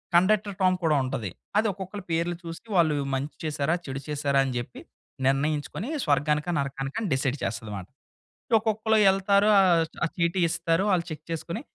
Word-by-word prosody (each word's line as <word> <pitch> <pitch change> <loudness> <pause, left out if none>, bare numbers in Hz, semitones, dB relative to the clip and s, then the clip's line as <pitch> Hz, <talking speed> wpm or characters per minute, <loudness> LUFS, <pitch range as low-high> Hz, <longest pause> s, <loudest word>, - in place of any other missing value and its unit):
Conductor 200 +2 +3
Tom 185 0 +4
కూడా 155 -2 +3
ఉంటది. 130 -7 -3 0.3
అది 220 - +3
ఒక్కొక్కళ్ళ 190 +1 -7
పేర్లు 170 +1 0
చూసి 165 +5 -8
వాళ్ళు 160 -4 +4 0.2
మంచి 140 +3 -4
చేసారా, 155 0 0
చెడు 135 0 -5
చేసారా 140 -2 +1
అని 135 - -2
జేప్పి 120 0 -6 0.5
నిర్ణయించుకొని 145 - 0 0.2
స్వర్గానికా, 150 +2 +1
నరకానికని 140 +9 -3
డిసైడ్ 135 +1 0
చేస్తదమాట. 105 -5 -4 0.7
ఒక్కొక్కళ్ళు 220 0 +1
వెళ్తారు 200 +1 +3
ఆహ్, 175 -4 +5 0.2
ఆ - - +1
చీటీ 170 +2 +1
ఇస్తారు, 165 +2 +1
ఆళ్ళు 170 -2 +1
చెక్ 155 -1 -7
చేసుకొని 170 +6 -4
165 Hz, 150 wpm, -26 LUFS, 140-185 Hz, 0.7 s, ఆహ్